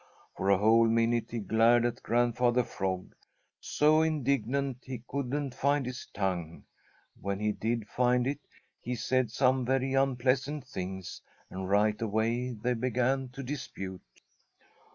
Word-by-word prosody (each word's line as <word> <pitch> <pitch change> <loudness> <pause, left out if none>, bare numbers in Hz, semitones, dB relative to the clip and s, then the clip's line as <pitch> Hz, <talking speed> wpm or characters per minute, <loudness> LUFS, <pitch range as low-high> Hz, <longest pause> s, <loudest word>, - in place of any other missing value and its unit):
For 95 - -1
a 100 - +6
whole 115 +3 +5
minute 115 +1 +1
he 120 - -4
glared 115 +2 +3
at 120 0 -2
Grandfather 120 +1 +2
Frog, 95 -4 -4 0.5
so 155 +1 +3
indignant 140 -4 0
he 125 -3 -7
couldn't 140 0 -2
find 140 +1 +1
his 125 +1 -6
tongue. 90 -5 -3 0.6
When 100 +1 -2
he 105 0 +1
did 115 0 -2
find 125 +1 +2
it, 140 +2 -1 0.4
he 125 - -4
said 130 0 0
some 130 +2 +2
very 135 +1 0
unpleasant 135 +1 +1
things, 95 -7 -6 0.3
and 95 0 -5
right 105 +2 +2
away 115 +3 0
they 120 +3 -1
began 125 +2 0
to 135 0 -6
dispute. 95 -9 -6
120 Hz, 135 wpm, -30 LUFS, 110-130 Hz, 0.6 s, a